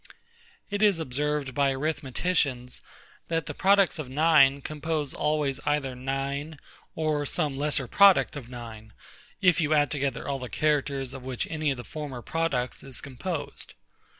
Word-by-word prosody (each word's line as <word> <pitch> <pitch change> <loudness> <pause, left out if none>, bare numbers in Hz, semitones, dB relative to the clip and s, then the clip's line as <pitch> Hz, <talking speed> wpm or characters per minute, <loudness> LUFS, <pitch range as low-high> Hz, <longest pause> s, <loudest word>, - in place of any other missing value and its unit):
It 205 0 -1
is 205 -4 +5
observed 150 -1 -2
by 140 +1 +2
arithmeticians, 135 -2 -1 0.5
that 165 -2 -1
the 145 - -5
products 195 0 +3
of 140 -4 -5
9, 140 -2 +4
compose 155 -1 -2
always 150 -3 0
either 145 -3 0
9, 135 +4 -3 0.4
or 155 -2 0
some 150 -5 0
lesser 145 -1 0
product 200 +6 +5
of 130 -5 -8
9, 110 -3 -9 0.5
if 180 -2 +5
you 155 0 +2
add 145 -3 +3
together 140 -3 -2
all 140 -1 -2
the 125 -1 -6
characters 140 -3 0
of 135 - -7
which 130 +4 -3
any 155 -2 0
of 135 - -1
the 120 - -7
former 135 -1 -6
products 160 -7 -1
is 135 -2 -2
composed. 145 +4 -4
145 Hz, 150 wpm, -27 LUFS, 130-155 Hz, 0.5 s, is